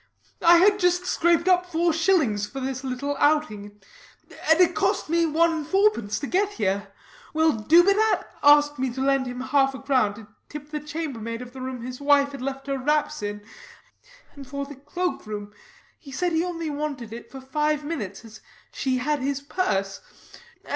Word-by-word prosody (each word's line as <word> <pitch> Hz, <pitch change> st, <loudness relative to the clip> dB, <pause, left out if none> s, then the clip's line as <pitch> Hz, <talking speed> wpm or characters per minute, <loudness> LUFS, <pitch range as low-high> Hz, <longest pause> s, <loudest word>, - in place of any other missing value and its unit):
I 340 Hz, 0 st, +7 dB
had 405 Hz, +3 st, +4 dB
just 360 Hz, -1 st, +2 dB
scraped 345 Hz, 0 st, +2 dB
up 360 Hz, -1 st, +3 dB
four 340 Hz, -1 st, +1 dB
shillings 310 Hz, -, +1 dB
for 270 Hz, -, -7 dB
this 265 Hz, 0 st, -4 dB
little 270 Hz, +2 st, -3 dB
outing; 210 Hz, -10 st, 0 dB, 0.7 s
and 320 Hz, +1 st, +5 dB
it 355 Hz, -1 st, +5 dB
cost 390 Hz, -4 st, 0 dB
me 335 Hz, 0 st, +3 dB
one 330 Hz, +2 st, +3 dB
and 310 Hz, -3 st, -4 dB
fourpence 385 Hz, -, +2 dB
to -, -, -2 dB
get 395 Hz, +7 st, 0 dB
here. 200 Hz, -2 st, -1 dB, 0.5 s
Well, 320 Hz, 0 st, +4 dB
Dubedat 350 Hz, -, +3 dB, 0.2 s
asked 290 Hz, -1 st, +5 dB
me 260 Hz, 0 st, 0 dB
to 260 Hz, -, -7 dB
lend 270 Hz, -1 st, +1 dB
him 250 Hz, 0 st, -5 dB
half 270 Hz, 0 st, +2 dB
a -, -, -8 dB
crown 255 Hz, -7 st, +1 dB
to 215 Hz, -1 st, -12 dB, 0.2 s
tip 295 Hz, 0 st, -9 dB
the 300 Hz, -, -3 dB
chambermaid 275 Hz, -7 st, -5 dB
of 245 Hz, 0 st, -13 dB
the 265 Hz, -, -9 dB
room 255 Hz, -2 st, -5 dB
his 250 Hz, +2 st, -7 dB
wife 285 Hz, 0 st, +3 dB
left 270 Hz, +1 st, -5 dB
her 275 Hz, -1 st, -2 dB
wraps 300 Hz, +1 st, 0 dB
in, 205 Hz, 0 st, -5 dB, 0.9 s
and 275 Hz, -2 st, -11 dB
for 280 Hz, +1 st, -4 dB
the 290 Hz, -, -10 dB
cloakroom. 260 Hz, -, -5 dB, 0.5 s
He 280 Hz, -, -13 dB
said 350 Hz, +6 st, -1 dB
he 325 Hz, 0 st, +1 dB
only 335 Hz, -3 st, -4 dB
wanted 285 Hz, -6 st, -5 dB
it 235 Hz, -, -9 dB
for 270 Hz, -, -8 dB
five 300 Hz, +3 st, -1 dB
minutes, 220 Hz, -, -5 dB
as 215 Hz, -1 st, -13 dB, 0.3 s
she 260 Hz, -2 st, -1 dB
had 295 Hz, +4 st, -1 dB
his 280 Hz, +1 st, -2 dB
purse. 195 Hz, -, -2 dB
285 Hz, 180 wpm, -24 LUFS, 255-330 Hz, 0.9 s, I